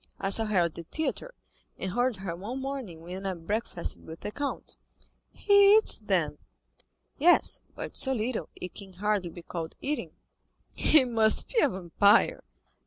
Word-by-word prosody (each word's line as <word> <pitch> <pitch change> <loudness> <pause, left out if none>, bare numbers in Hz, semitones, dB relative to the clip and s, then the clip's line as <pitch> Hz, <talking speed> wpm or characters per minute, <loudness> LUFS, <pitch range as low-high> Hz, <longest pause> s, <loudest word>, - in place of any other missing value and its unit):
I 195 - -1
saw 225 +3 +5
her 210 -4 +2
at 170 -2 0
the - - -7
theatre, 315 - -4 0.4
and 190 - -4
heard 245 +3 +1
her 190 -3 -5
one 215 +9 -6
morning 265 -12 -6
when 185 +3 -6
I 190 - -2
breakfasted 175 +1 -4
with 160 +1 -10
the 210 - -5
count." 285 +4 -5 0.6
"He 405 0 +5
eats, 440 - +3
then?" - - -1 0.8
"Yes; 345 +5 +4
but - - -6
so 265 - +4
little, 240 -1 -2
it 180 - -8
can 195 -2 -10
hardly 200 -1 -1
be 170 +1 -11
called 165 -2 -6
eating." 295 +2 -3 0.6
"He 300 -4 +4
must 225 -3 +2
be 480 - +1
a - - +4
vampire." 200 - +3
210 Hz, 165 wpm, -28 LUFS, 180-265 Hz, 0.8 s, saw